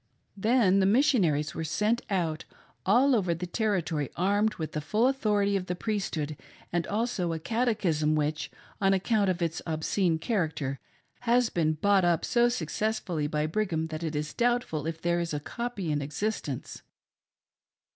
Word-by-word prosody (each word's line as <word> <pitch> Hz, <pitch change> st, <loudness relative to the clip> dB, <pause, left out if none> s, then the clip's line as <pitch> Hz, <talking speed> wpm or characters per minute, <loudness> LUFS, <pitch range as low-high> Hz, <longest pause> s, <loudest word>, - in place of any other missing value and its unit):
Then 210 Hz, -2 st, +3 dB
Missionaries 185 Hz, -, +3 dB
were 160 Hz, -, -4 dB
sent 210 Hz, +9 st, +1 dB
out 170 Hz, -6 st, -1 dB, 0.4 s
all 250 Hz, +7 st, +5 dB
over 180 Hz, -6 st, +1 dB
the 175 Hz, +2 st, -4 dB
territory 175 Hz, -, -1 dB
armed 205 Hz, +4 st, +1 dB
with 160 Hz, -2 st, -4 dB
the 150 Hz, -, -3 dB
full 215 Hz, -, +2 dB
authority 210 Hz, -7 st, +1 dB
of 185 Hz, -1 st, -2 dB
the 180 Hz, -, -2 dB
Priesthood 175 Hz, -8 st, -2 dB, 0.4 s
and 175 Hz, -1 st, 0 dB
also 205 Hz, -5 st, -1 dB
a 160 Hz, -, -3 dB
catechism 190 Hz, -8 st, +1 dB
which, 150 Hz, +1 st, -1 dB, 0.3 s
on 195 Hz, 0 st, +4 dB
account 200 Hz, +1 st, +1 dB
of 180 Hz, -1 st, 0 dB
its 165 Hz, 0 st, -2 dB
obscene 160 Hz, +2 st, +1 dB
character, 160 Hz, -, -2 dB, 0.4 s
has 245 Hz, +1 st, +3 dB
since 230 Hz, -, -1 dB
been 155 Hz, -2 st, +2 dB
bought 195 Hz, +4 st, +3 dB
up 170 Hz, -2 st, +2 dB
so 240 Hz, 0 st, +3 dB
successfully 215 Hz, -9 st, -2 dB
by 150 Hz, 0 st, -1 dB
Brigham 160 Hz, -2 st, -1 dB
that 155 Hz, 0 st, -5 dB
it 160 Hz, -2 st, -3 dB
is 150 Hz, +1 st, -3 dB
doubtful 240 Hz, -, 0 dB
if 165 Hz, 0 st, -4 dB
there 170 Hz, +1 st, +1 dB
is 170 Hz, -3 st, -2 dB
a -, -, -1 dB
copy 205 Hz, 0 st, -4 dB
in 145 Hz, -1 st, 0 dB
existence. 150 Hz, -, -4 dB
180 Hz, 160 wpm, -28 LUFS, 155-215 Hz, 0.4 s, all